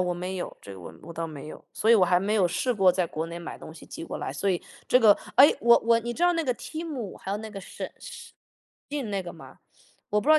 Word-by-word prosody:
我 180 Hz, -1 st, 0 dB
没 180 Hz, +2 st, -4 dB
有， 180 Hz, -, -5 dB
这 100 Hz, -, -9 dB
个 95 Hz, -, -10 dB
我 80 Hz, -, -9 dB
我 170 Hz, -, -9 dB
倒 165 Hz, 0 st, -3 dB
没 155 Hz, -2 st, -9 dB
有， -, -, -10 dB
所 220 Hz, -, +1 dB
以 -, -, +9 dB
我 195 Hz, -5 st, +6 dB
还 180 Hz, 0 st, +3 dB
没 200 Hz, +3 st, -1 dB
有 195 Hz, -4 st, +4 dB
试 250 Hz, +8 st, 0 dB
过 195 Hz, -5 st, +5 dB
在 180 Hz, -1 st, 0 dB
国 160 Hz, +1 st, -4 dB
内 170 Hz, +1 st, -6 dB
买 170 Hz, -, -8 dB
东 -, -, -10 dB
西 -, -, -12 dB
寄 -, -, -8 dB
过 -, -, -5 dB
来， -, -, -4 dB
所 170 Hz, +8 st, -1 dB
以 180 Hz, -3 st, 0 dB, 0.3 s
这 250 Hz, -, +6 dB
个 220 Hz, -4 st, +7 dB, 0.2 s
哎， 280 Hz, -, +8 dB
我 235 Hz, 0 st, +7 dB
我 230 Hz, 0 st, +5 dB
你 240 Hz, +1 st, -4 dB
知 335 Hz, -, -4 dB
道 355 Hz, 0 st, +5 dB
那 330 Hz, -1 st, 0 dB
个 255 Hz, -4 st, 0 dB
TEMU， 295 Hz, -, -6 dB
还 190 Hz, -, -6 dB
有 200 Hz, -, 0 dB
那 220 Hz, +1 st, -7 dB
个 200 Hz, -2 st, -7 dB
沈 -, -, -7 dB, 1.0 s
SHEIN 290 Hz, -2 st, -3 dB
那 200 Hz, -1 st, -1 dB
个 175 Hz, -, -7 dB
吗？ -, -, -14 dB, 0.5 s
我 210 Hz, -, +2 dB
不 275 Hz, -, -4 dB
知 -, -, +10 dB
道 310 Hz, -, +7 dB
195 Hz, 345 characters per minute, -27 LUFS, 175-235 Hz, 1.0 s, 知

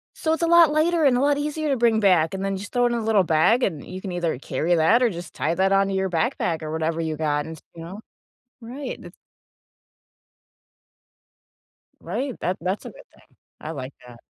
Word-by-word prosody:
so 315 Hz, -, 0 dB
it's 325 Hz, -, -2 dB
a -, -, +2 dB
lot 335 Hz, -2 st, +6 dB
lighter 320 Hz, +1 st, +2 dB
and 255 Hz, -3 st, +4 dB
a -, -, +1 dB
lot 285 Hz, 0 st, +2 dB
easier 300 Hz, +1 st, -2 dB
to 275 Hz, -, +1 dB
bring 230 Hz, -2 st, +3 dB
back, 180 Hz, -5 st, +3 dB
and 190 Hz, 0 st, -4 dB
then 195 Hz, -1 st, -2 dB
just 205 Hz, +2 st, -8 dB
throw 245 Hz, 0 st, +2 dB
it -, -, +3 dB
in -, -, 0 dB
a 235 Hz, -, -1 dB
little 215 Hz, -3 st, +3 dB
bag, 175 Hz, +10 st, +3 dB
and 160 Hz, -7 st, -1 dB
you 185 Hz, +1 st, -7 dB
can 190 Hz, -, -6 dB
either 175 Hz, -5 st, -2 dB
carry 150 Hz, +6 st, -1 dB
that 170 Hz, +10 st, +4 dB
or 245 Hz, -, +4 dB
just 175 Hz, -4 st, -8 dB
tie 165 Hz, +2 st, -1 dB
that 190 Hz, +2 st, +2 dB
onto 195 Hz, 0 st, +2 dB
your 190 Hz, 0 st, 0 dB
backpack 165 Hz, 0 st, -1 dB
or 155 Hz, 0 st, -5 dB
whatever 160 Hz, +1 st, -1 dB
you 160 Hz, -1 st, -2 dB
got 150 Hz, -2 st, -1 dB
and 160 Hz, 0 st, -8 dB
s -, -, -17 dB
you 165 Hz, -, -9 dB
know? 185 Hz, +5 st, -8 dB, 0.6 s
Right. 255 Hz, +4 st, -6 dB
That's -, -, -12 dB, 2.9 s
Right. 265 Hz, -1 st, -4 dB
That 185 Hz, -, -1 dB
that's 185 Hz, +4 st, -3 dB
a -, -, -6 dB
good -, -, -15 dB
thing. -, -, -23 dB, 0.3 s
I 155 Hz, -, -5 dB
like 135 Hz, -3 st, -7 dB
that. 120 Hz, -1 st, -13 dB
190 Hz, 220 wpm, -23 LUFS, 160-250 Hz, 2.9 s, lot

